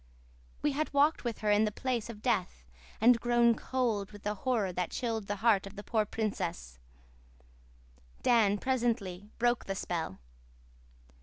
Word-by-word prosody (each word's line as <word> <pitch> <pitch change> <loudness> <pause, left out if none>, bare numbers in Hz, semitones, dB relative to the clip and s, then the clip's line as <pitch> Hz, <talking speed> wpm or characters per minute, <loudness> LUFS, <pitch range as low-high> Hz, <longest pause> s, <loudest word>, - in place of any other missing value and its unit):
We 295 - +3
had 305 +3 -2
walked 295 +3 +3
with 235 -3 -4
her 210 -1 +2
in 205 +1 +4
the 210 - -1
place 240 0 -2
of 215 -2 -9
death 185 - -1 0.3
and 235 +2 +6
grown 240 0 +4
cold 225 -5 -1
with 205 -1 -12
the 210 - -1
horror 210 -4 -1
that 180 0 -2
chilled 225 -4 -3
the 205 - -1
heart 200 -4 +4
of 195 - -11
the 205 - -8
poor 220 -1 +1
princess. 175 - -3 1.4
Dan 215 -4 +4
presently 220 -6 -1
broke 240 0 +1
the 195 - -3
spell. 165 - -3
220 Hz, 155 wpm, -31 LUFS, 200-240 Hz, 1.4 s, and